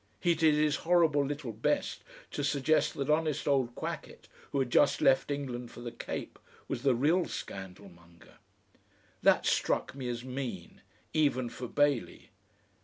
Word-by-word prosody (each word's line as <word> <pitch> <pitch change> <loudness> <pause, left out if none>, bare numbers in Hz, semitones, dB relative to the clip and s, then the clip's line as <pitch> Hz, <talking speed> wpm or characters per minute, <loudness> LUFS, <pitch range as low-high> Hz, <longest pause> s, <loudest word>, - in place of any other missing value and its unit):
He 175 - +3
did 160 -2 +3
his 150 0 +2
horrible 165 -4 +3
little 140 -3 -4
best 110 - -1 0.3
to 145 - -3
suggest 145 +2 +2
that 140 - -2
honest 155 -1 +1
old 130 -4 +1
Quackett, - - -6 0.2
who - - -1
had 130 -3 0
just - - +4
left 135 +1 +3
England 125 -4 -4
for 120 - -11
the 120 -1 -5
Cape, - - -6 0.3
was - - -3
the 135 -2 +3
real 160 +8 +2
scandalmonger. 90 -3 -10 0.8
That - - +4
struck - - +1
me 130 -2 -5
as 120 0 -4
mean, 125 -9 -6 0.3
even 140 -6 +2
for 125 - -7
Bailey. 145 -4 0
135 Hz, 150 wpm, -31 LUFS, 120-150 Hz, 0.8 s, just